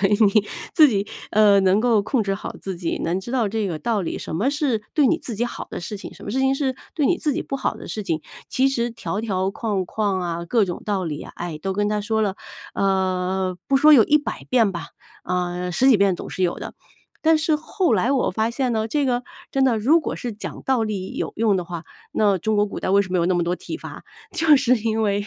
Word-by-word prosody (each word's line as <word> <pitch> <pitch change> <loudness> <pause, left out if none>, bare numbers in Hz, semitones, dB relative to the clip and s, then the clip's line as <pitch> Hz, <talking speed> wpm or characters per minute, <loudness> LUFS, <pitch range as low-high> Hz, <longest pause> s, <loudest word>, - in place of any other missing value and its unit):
对 195 - +3
你 210 -1 +4 0.3
自 310 -4 +8
己， 205 -4 0 0.2
呃， 205 -2 +5
能 190 +1 +4
够 230 -4 +3
控 225 +2 0
制 195 -1 -1
好 200 - -6
自 190 - -4
己， 170 -1 -2
能 175 +3 0
知 235 - -8
道 245 -4 +1
这 215 -1 -1
个 160 -4 -3
道 230 0 0
理， 170 - -3
什 - - -6
么 215 +11 +1
是 280 -7 0
对 295 -3 +4
你 325 - +3
自 235 -8 -5
己 235 - 0
好 240 - -6
的 - - -5
事 205 +4 -5
情， - - -9
什 - - -12
么 205 - -5
事 265 - 0
情 265 0 +3
是 270 -2 -1 0.2
对 300 - +1
你 355 - +2
自 300 - 0
己 335 - -1
不 - - -5
好 - - -1
的 - - -10
事 215 - -4
情。 165 -5 -1 0.3
其 265 +1 +2
实 240 -3 -1
条 225 -3 -4
条 190 -4 -1
框 205 -2 -2
框 200 +1 -1
啊， 170 -1 -3
各 225 +2 +3
种 175 -2 -5
道 200 -3 -1
理 150 -3 -4
啊， - - -10
唉， 170 -3 -5
都 190 +5 -3
跟 205 +2 0
他 210 0 0
说 220 +1 0
了， 200 -3 0 0.4
呃， 185 -1 0
不 275 - +4
说 305 +3 +7
有 265 -6 +8
100 300 +4 0
遍 230 -6 +3
吧， 170 - -5 0.4
啊， 180 0 -2
10 260 +9 +3
几 255 - +7
遍 200 -2 +3
总 - - -7
是 185 - -4
有 175 -1 0
的。 - - -7 0.5
但 320 0 +5
是 310 0 +2
后 325 - 0
来 225 +6 +2
我 270 - +1
发 220 +4 0
现 250 -1 0
呢， 220 0 0
这 285 +5 0
个 245 -1 0 0.3
真 270 -1 +2
的 250 -4 +3
如 275 +10 +4
果 - - -3
是 240 - -5
讲 210 - -7
道 255 -4 +1
理 200 -3 -4
有 - - -3
用 215 -3 +2
的 180 - -2
话， 170 -1 -6 0.3
那 200 -3 +2
中 215 +5 0
国 205 - +3
古 205 - -6
代 - - -3
为 200 +1 +4
什 190 - -9
么 185 - +2
有 170 - +2
那 185 - +2
么 175 - +1
多 175 +1 -1
体 325 - -6
罚， - - -10 0.3
就 315 -2 +5
是 255 -2 +3
因 220 0 -1
为 205 -1 0
210 Hz, 275 characters per minute, -22 LUFS, 190-255 Hz, 0.5 s, 自